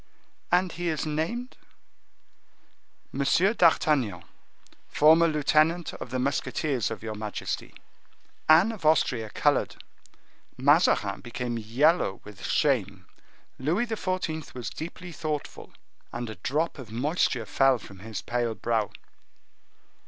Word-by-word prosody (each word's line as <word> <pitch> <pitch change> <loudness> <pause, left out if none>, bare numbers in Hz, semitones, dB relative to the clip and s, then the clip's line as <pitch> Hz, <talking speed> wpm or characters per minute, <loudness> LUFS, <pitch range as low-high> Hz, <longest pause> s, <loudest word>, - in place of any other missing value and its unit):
"And 180 0 +3
he 175 +2 -4
is 160 -2 -1
named?" 165 - -3 1.5
"Monsieur 170 +9 +2
d'Artagnan, 150 - +2 0.6
formerly 160 +2 +5
lieutenant 155 +3 +2
of - - -8
the 130 - -2
musketeers 135 -1 -1
of 110 -2 -7
your 110 -1 -4
majesty." 105 0 -5 0.7
Anne 170 +8 +7
of 215 -6 -9
Austria 125 -8 +2
colored; - - +1 0.8
Mazarin - - +3
became 120 0 -4
yellow 120 - +2
with 105 -2 -12
shame; 100 - 0 0.5
Louis 165 - +1
XIV. 185 - -3
was 125 -2 -5
deeply 175 +2 -7
thoughtful, 155 -3 -5 0.4
and 120 -2 -5
a - - -8
drop 150 - -1
of 120 -5 -10
moisture 125 -1 0
fell 135 +3 +3
from 100 -4 -13
his 105 -3 -6
pale 120 +2 -1
brow. 110 -3 0
140 Hz, 115 wpm, -27 LUFS, 115-165 Hz, 1.5 s, Anne